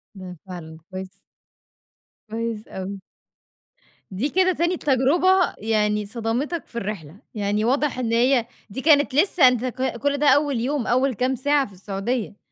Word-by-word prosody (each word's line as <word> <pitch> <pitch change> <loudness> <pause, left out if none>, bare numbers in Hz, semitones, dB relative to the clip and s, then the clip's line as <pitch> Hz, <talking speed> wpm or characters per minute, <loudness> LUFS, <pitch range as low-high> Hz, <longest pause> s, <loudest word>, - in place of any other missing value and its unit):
ده 180 -2 -9
فعلًا 160 -3 -8
كويس 185 0 -6 1.2
كويس 225 -1 -4
أوي. 190 +1 -6 1.1
دي 220 +10 -1
كده 370 +2 +3
تاني 345 +2 0
تجربة 335 +8 +3
يعني 210 -1 0
صدمتك 240 +8 -3
في - - -21
الرحلة، 195 -8 -5 0.2
يعني 210 +1 0
واضح 270 +1 +1
إن 230 -2 -1
هي 245 0 +3 0.2
دي 265 +7 -5
كانت 290 -3 +4
لسه 330 -3 +5
أنت 250 0 +2
ك 255 0 -2
كُل 285 +4 0
ده 295 +1 +1
أول 285 -4 +3
يوم، 265 +1 -1
أول 255 +2 +2
كام 255 +4 0
ساعة 285 +2 +2
في 200 - -16
السعودية. 200 +4 -3
245 Hz, 150 wpm, -23 LUFS, 210-285 Hz, 1.2 s, لسه